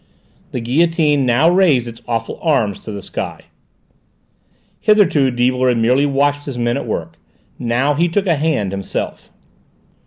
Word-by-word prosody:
The - - -3
guillotine 150 +2 +2
now 125 +6 +3
raised 170 -9 +3
its 115 0 -10
awful 115 -1 -3
arms 120 - +1
to 110 - -8
the 100 -2 -7
sky. - - -5 1.4
Hitherto 185 -11 +3
Deibler 125 +1 +1
had 120 - +1
merely 125 +5 +2
watched 145 +1 0
his 135 -4 -6
men 120 0 0
at - - -5
work. 85 -6 -4 0.4
Now 125 +5 +1
he 170 +4 +1
took 195 +4 0
a 175 - +3
hand 145 -10 -1
himself. 100 -1 -5
130 Hz, 150 wpm, -18 LUFS, 115-155 Hz, 1.4 s, now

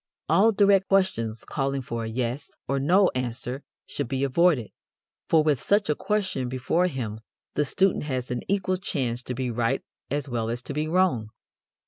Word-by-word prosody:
All 220 +4 +5
direct 200 -2 +4
questions, 115 - +1
calling 135 -1 -2
for 115 -1 -4
a - - -3
"yes" 120 +4 -3
or 140 0 0
"no" 180 +7 +4
answer 125 +1 -3 0.2
should 145 - -4
be 135 +2 -1
avoided, 140 -3 +3 0.6
for 160 -2 +5
with 150 -5 +2
such 205 -5 +2
a - - +1
question 190 - -1
before 130 +8 +1
him 115 -9 -4 0.3
the 150 - +1
student 190 +2 +1
has 130 -3 -3
an 125 - -2
equal 190 -1 +1
chance 130 - -2
to 125 0 -5
be 125 -1 -2
right 115 0 0 0.3
as 145 +1 -2
well 115 -3 -2
as 120 +1 -3
to - - -5
be 150 +2 -1
wrong. 165 -11 +2
135 Hz, 175 wpm, -26 LUFS, 120-180 Hz, 0.6 s, All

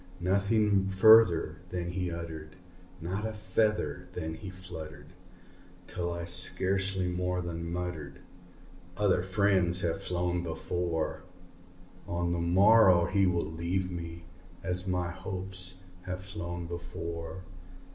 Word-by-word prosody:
Nothing 100 +2 +2
further 95 -2 +6
then 85 -1 -3
he 90 0 -2
uttered 80 -2 -7 0.4
not 90 +5 -3
a 110 0 -2
feather 105 0 0
then 80 -2 -4
he 95 +4 -8
fluttered 80 -5 -9 0.7
Till 85 -1 -3
I 85 0 -4
scarcely 95 +2 +1
more 90 0 -1
than 85 -1 -4
muttered, 85 -6 -4 0.8
"Other 100 -4 +3
friends 95 -2 +2
have 85 +2 -1
flown 90 -1 -1
before 85 -1 -2 0.9
On 85 0 -1
the 85 - -1
morrow 95 0 +6
he 95 +1 +2
will 90 -2 +1
leave 90 +3 -2
me, 85 -1 -7 0.4
as 90 0 -2
my 90 -1 -1
hopes 95 0 -3 0.2
have 90 0 -4
flown 85 -3 -5
before." 85 0 -6
90 Hz, 115 wpm, -30 LUFS, 85-95 Hz, 0.9 s, further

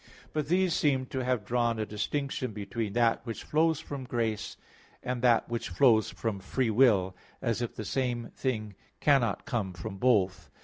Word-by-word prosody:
But 150 -2 -1
these 180 +1 +2
seem 135 -4 +2
to 130 -1 -1
have 125 -4 0
drawn 120 0 +1
a 110 - -1
distinction 130 +4 -3
between 105 +1 -4
that 115 -1 +2
which 115 -2 -6
flows 160 0 +2
from 140 -4 -6
grace, 115 -3 -2 0.5
and 125 -1 -2
that 120 -2 +4
which 120 -2 -3
flows 110 +3 +4
from 110 -4 -3
free 115 +5 -1
will, 105 -6 +4 0.2
as 115 -2 -1
if 120 - -3
the 110 - -5
same 120 -2 -2
thing 110 -6 -2 0.3
cannot 135 -8 +2
come 110 -9 -2
from 90 +3 -7
both. 95 -5 +2
120 Hz, 170 wpm, -29 LUFS, 110-130 Hz, 0.5 s, that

